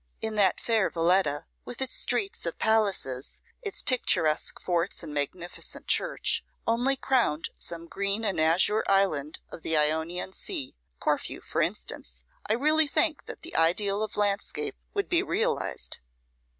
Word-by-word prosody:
If 220 Hz, 0 st, -1 dB
that 200 Hz, -3 st, +3 dB
fair 225 Hz, -4 st, +2 dB
Valetta, 165 Hz, -3 st, +2 dB, 0.2 s
with 245 Hz, -, -8 dB
its 265 Hz, -1 st, +2 dB
streets 395 Hz, -2 st, -1 dB
of 165 Hz, -, -2 dB
palaces, 200 Hz, -12 st, +1 dB, 0.2 s
its 410 Hz, -4 st, -4 dB
picturesque 165 Hz, -, +2 dB
forts 175 Hz, +1 st, -1 dB
and 155 Hz, -2 st, -7 dB
magnificent 170 Hz, +5 st, -3 dB
church, -, -, +2 dB, 0.2 s
only 245 Hz, +4 st, +2 dB
crowned 240 Hz, -, +1 dB
some 170 Hz, 0 st, -5 dB
green 200 Hz, +5 st, -1 dB
and 190 Hz, -6 st, +1 dB
azure 180 Hz, +7 st, +4 dB
island 170 Hz, -7 st, +1 dB
of -, -, -8 dB
the 160 Hz, 0 st, +1 dB
Ionian 160 Hz, +5 st, +1 dB
Sea, 130 Hz, -, -1 dB, 0.2 s
Corfu -, -, 0 dB
for -, -, -2 dB
instance, -, -, -2 dB, 0.3 s
I -, -, +4 dB
really 305 Hz, +6 st, +3 dB
think 310 Hz, +1 st, +1 dB
that -, -, -8 dB
the 340 Hz, -, -7 dB
ideal 195 Hz, +5 st, +2 dB
of 215 Hz, -1 st, -3 dB
landscape 205 Hz, -1 st, 0 dB, 0.2 s
would 400 Hz, -1 st, 0 dB
be 345 Hz, -1 st, +3 dB
realised. 455 Hz, +5 st, -1 dB
195 Hz, 145 wpm, -28 LUFS, 165-245 Hz, 0.3 s, azure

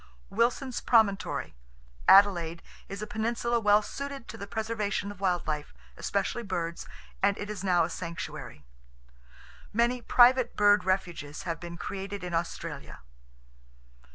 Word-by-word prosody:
Wilson's 240 Hz, +4 st, 0 dB
Promontory. 220 Hz, -5 st, +2 dB, 0.5 s
Adelaide, 175 Hz, -4 st, +5 dB, 0.3 s
is 200 Hz, +2 st, -5 dB
a -, -, -2 dB
peninsula 235 Hz, +2 st, -1 dB
well 210 Hz, -1 st, +4 dB
suited 280 Hz, +1 st, -6 dB
to -, -, -7 dB
the 200 Hz, -, -7 dB
preservation 215 Hz, -2 st, -2 dB
of 205 Hz, -, -12 dB
wild 180 Hz, -3 st, 0 dB
life, 150 Hz, -1 st, -4 dB, 0.2 s
especially 200 Hz, +4 st, -1 dB
birds, 170 Hz, -5 st, -4 dB, 0.3 s
and 200 Hz, 0 st, +3 dB
it 205 Hz, +1 st, -5 dB
is 200 Hz, -2 st, -6 dB
now 180 Hz, -3 st, +3 dB
a 165 Hz, -, -1 dB
sanctuary. 170 Hz, -, -6 dB, 1.1 s
Many 240 Hz, +3 st, +1 dB
private 245 Hz, +1 st, +5 dB
bird 205 Hz, -2 st, +4 dB
refuges 175 Hz, -6 st, -2 dB
have 165 Hz, -2 st, -3 dB
been 170 Hz, 0 st, -8 dB
created 195 Hz, +1 st, -5 dB
in 180 Hz, -1 st, -5 dB
Australia. 165 Hz, +1 st, -4 dB
200 Hz, 130 wpm, -29 LUFS, 175-225 Hz, 1.1 s, Adelaide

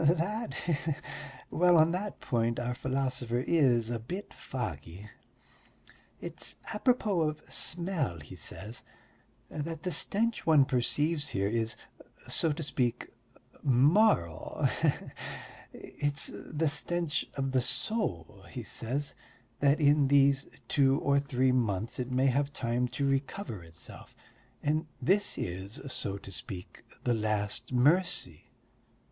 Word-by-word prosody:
"That... 180 Hz, +9 st, +1 dB
he 175 Hz, -, -1 dB
he.... 155 Hz, +2 st, -1 dB, 0.6 s
Well, 175 Hz, 0 st, +5 dB
on 160 Hz, +1 st, +6 dB
that 195 Hz, +4 st, -3 dB
point 115 Hz, -1 st, 0 dB
our 120 Hz, 0 st, -1 dB
philosopher 130 Hz, -2 st, -1 dB
is 125 Hz, -7 st, +3 dB
a 120 Hz, -, -1 dB
bit 180 Hz, -, -6 dB
foggy. 95 Hz, -, -6 dB, 1.1 s
It's -, -, -2 dB, 0.2 s
apropos 210 Hz, -5 st, +2 dB
of 155 Hz, -1 st, -1 dB
smell, 165 Hz, -, -1 dB
he 75 Hz, -, -11 dB
said, 110 Hz, +5 st, -6 dB, 0.7 s
that 160 Hz, +1 st, -4 dB
the 180 Hz, -, -1 dB
stench 225 Hz, +6 st, +1 dB
one 155 Hz, -4 st, +6 dB
perceives 145 Hz, +5 st, +1 dB
here 100 Hz, 0 st, 0 dB
is, 110 Hz, +1 st, 0 dB, 0.5 s
so 165 Hz, -, +2 dB
to 160 Hz, +2 st, -3 dB
speak, 125 Hz, -4 st, -1 dB, 0.5 s
moral 135 Hz, -, +3 dB, 0.2 s
he -, -, +5 dB
he! -, -, 0 dB, 0.7 s
It's 145 Hz, -1 st, -2 dB
the 155 Hz, +1 st, -2 dB
stench 160 Hz, +2 st, 0 dB
of 135 Hz, -1 st, -1 dB
the 130 Hz, -1 st, +3 dB
soul, 125 Hz, -, -2 dB
he -, -, -6 dB
says, 135 Hz, +5 st, -2 dB, 0.5 s
that 140 Hz, +2 st, +4 dB
in 145 Hz, -1 st, +5 dB
these 140 Hz, 0 st, +4 dB, 0.2 s
two 135 Hz, -1 st, +4 dB
or 140 Hz, 0 st, +3 dB
three 130 Hz, -2 st, +2 dB
months 115 Hz, -4 st, 0 dB
it 125 Hz, 0 st, -2 dB
may 130 Hz, +1 st, +2 dB
have 140 Hz, +2 st, +2 dB
time 120 Hz, +1 st, 0 dB
to 140 Hz, +3 st, -2 dB
recover 135 Hz, -, -2 dB
itself... 80 Hz, 0 st, -10 dB, 0.5 s
and 155 Hz, +2 st, +1 dB
this 205 Hz, +3 st, +2 dB
is, 95 Hz, +3 st, -4 dB
so 100 Hz, 0 st, -2 dB
to 100 Hz, -, -10 dB
speak, 95 Hz, -2 st, -7 dB, 0.2 s
the 120 Hz, -, +2 dB
last 105 Hz, +2 st, -1 dB
mercy.... 130 Hz, -, +2 dB
135 Hz, 130 wpm, -30 LUFS, 115-160 Hz, 1.1 s, on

